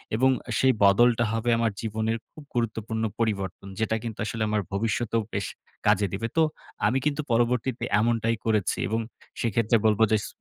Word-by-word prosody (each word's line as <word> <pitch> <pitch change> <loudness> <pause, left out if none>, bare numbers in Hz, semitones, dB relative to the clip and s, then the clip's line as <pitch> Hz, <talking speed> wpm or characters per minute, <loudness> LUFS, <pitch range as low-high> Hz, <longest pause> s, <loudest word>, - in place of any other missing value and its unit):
এবং 130 +4 +4 0.2
আ - - -2
সেই 130 -1 +5
বদলটা 120 +4 +5
হবে 115 +1 -1
আমার 115 -1 +1
জীবনের 110 +1 -1
খুব 155 - -12
গুরুত্বপূর্ণ 110 -1 -1 0.2
পরিবর্তন। 100 -4 -2
যেটা 110 0 +1
কিন্তু 115 -2 -6
আসলে 110 0 -2
আমার 105 -1 +1
ভবিষ্যতেও 115 +2 0
বেশ 100 -1 -1 0.4
কাজে 105 -1 +4
দিবে। 115 +4 -2
তো 160 - +6 0.4
আমি 125 - +2
কিন্তু 150 0 +1
পরবর্তীতে 120 +1 +1 0.2
এমনটাই 115 0 +1
করেছি 105 -4 +1
এবং 110 +2 0 0.4
সেক্ষেত্রে 115 0 +2
বলবো 110 0 +4
যে 110 - +5
ছ - - -5
115 Hz, 165 wpm, -26 LUFS, 110-120 Hz, 0.4 s, তো